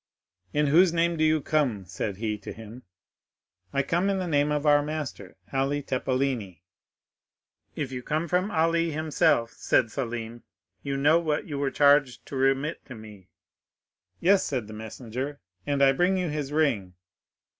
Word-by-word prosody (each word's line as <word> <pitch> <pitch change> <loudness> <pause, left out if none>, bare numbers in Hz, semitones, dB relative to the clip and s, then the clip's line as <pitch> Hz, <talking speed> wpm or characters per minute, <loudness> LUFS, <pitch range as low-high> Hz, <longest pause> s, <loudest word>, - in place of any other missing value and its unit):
'In 150 0 +1
whose 165 +5 +5
name 170 0 +1
do 155 - 0
you 155 -1 +3
come?' 135 -10 0
said 95 +2 -4
he 110 0 -2
to - - -8
him. 115 +3 -10 0.9
'I 140 - +1
come 175 +7 0
in 195 - +1
the 185 - -2
name 145 -3 +1
of 150 0 -1
our 145 -1 +5
master, 145 -10 -5 0.2
Ali 135 +2 0
Tepelini.'—'If 130 - -5
you 125 -1 -5
come 155 +6 -2
from 180 +4 +1
Ali 165 -1 +1
himself,' 150 -7 +1
said 115 -3 +1
Selim, 120 -2 -5 0.4
'you 140 -1 -3
know 150 +4 +4
what 155 -3 -1
you 145 -2 -5
were 140 -1 0
charged 140 -4 +3
to - - -8
remit 135 +3 0
to 130 - -9
me?'—'Yes,' 110 - -4
said 125 -6 -2
the 110 - -10
messenger, 120 +6 -6 0.3
'and 140 -1 +2
I 135 - +6
bring 180 +7 +2
you 180 -2 -1
his 150 -2 -3
ring. 120 - 0
140 Hz, 155 wpm, -26 LUFS, 120-155 Hz, 0.9 s, I